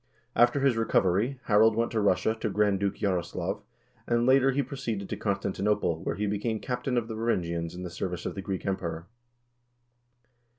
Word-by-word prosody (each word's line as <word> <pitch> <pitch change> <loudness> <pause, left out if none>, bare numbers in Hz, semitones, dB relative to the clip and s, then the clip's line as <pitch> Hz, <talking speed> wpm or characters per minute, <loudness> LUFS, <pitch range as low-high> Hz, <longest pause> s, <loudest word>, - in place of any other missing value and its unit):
After 120 +3 +4
his 135 -4 +3
recovery, 115 +3 +1
Harald 110 +1 +4
went 115 +1 0
to 110 -2 0
Russia 100 +2 +2
to 110 - -1
Grand 105 -1 +2
Duke 100 0 0
Jaroslaf, 90 -4 -2 0.5
and 120 0 +2
later 135 +1 +5
he 140 +2 +1
proceeded 115 -9 -4
to - - -2
Constantinople, 100 -3 0
where - - -2
he 105 - -1
became 105 +2 -1
captain 125 +1 -2
of 115 -2 0
the 115 - -5
Varangians 85 -7 -1
in 90 - -6
the 90 - -4
service 90 0 -4
of - - -2
the 95 - -5
Greek 95 -1 -4
Emperor. 85 -4 -3
105 Hz, 175 wpm, -28 LUFS, 95-120 Hz, 0.5 s, later